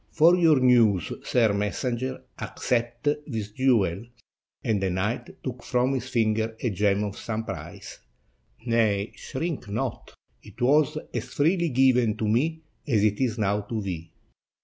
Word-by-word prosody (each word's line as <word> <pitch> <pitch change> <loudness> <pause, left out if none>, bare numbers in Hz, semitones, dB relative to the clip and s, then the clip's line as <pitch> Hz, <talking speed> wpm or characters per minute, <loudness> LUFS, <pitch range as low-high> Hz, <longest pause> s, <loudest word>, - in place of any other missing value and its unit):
For 165 +3 +5
your 165 -5 +4
news, 115 -8 +4
sir 115 -4 +2
messenger, 120 +5 -2 0.2
accept 120 +2 -2 0.2
this 110 -6 -4
jewel," 110 -7 +2 0.6
and 105 -3 0
the 95 - +1
knight 105 +7 -2
took 125 -2 -5
from 125 +2 +1
his 130 -1 -3
finger 110 -2 0
a 120 - -1
gem 100 +1 +1
of 100 -1 -4
some 110 -1 -3
price. - - -8 0.7
"Nay, 110 -3 +1
shrink 150 -5 -4
not; 115 +4 -4 0.3
it - - -15
was 150 +4 +3 0.2
as - - -2
freely 170 +3 +2
given 125 -4 +3
to 110 - -1
me 160 +9 0 0.2
as 110 -7 +2
it 105 -1 +2
is 125 -3 0
now 105 -1 +1
to 110 +2 -4
thee." 90 -5 -5
115 Hz, 150 wpm, -26 LUFS, 105-130 Hz, 0.7 s, For